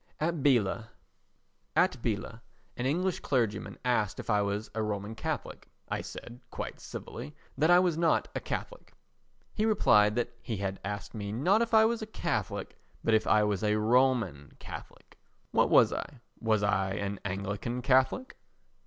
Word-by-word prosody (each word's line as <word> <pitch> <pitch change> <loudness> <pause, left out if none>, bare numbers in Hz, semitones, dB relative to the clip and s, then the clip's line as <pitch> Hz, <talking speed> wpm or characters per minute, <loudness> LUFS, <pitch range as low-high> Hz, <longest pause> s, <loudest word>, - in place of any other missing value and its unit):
At 170 +2 0
Biella 115 -5 +2 0.9
an 115 +1 -2
English 180 +6 0
clergyman 120 -6 -1
asked 110 -6 +1
if - - -3
I 105 -1 +3
was 100 +2 -2
a 110 - -1
Roman 105 0 -3
Catholic. 110 - -5 0.2
I - - -1
said, 120 +1 -9
quite - - -6
civilly, 75 - -8 0.2
that 155 +4 +2
I 175 - +8
was 175 -3 +2
not 170 -1 +2
a - - -2
Catholic. - - -6 0.6
He 215 - -1
replied 105 - +4
that 120 - -1
he 110 - -4
had 95 0 -3
asked 100 -1 -5
me 100 -2 -4
not 180 - +3
if 230 -1 +1
I 220 0 +7
was 230 0 0
a 220 - -5
Catholic 155 - -3 0.2
but 115 - +2
if 110 - +3
I 105 +1 +5
was 105 -1 0
a 105 0 +2
Roman 110 - +2
Catholic. - - -11 0.3
What - - +3
was - - +6
I? 140 - -6 0.2
Was 110 -2 +1
I 95 -2 +1
an 100 0 -3
Anglican 100 +5 -3
Catholic? 135 - +2
115 Hz, 160 wpm, -30 LUFS, 105-145 Hz, 0.9 s, I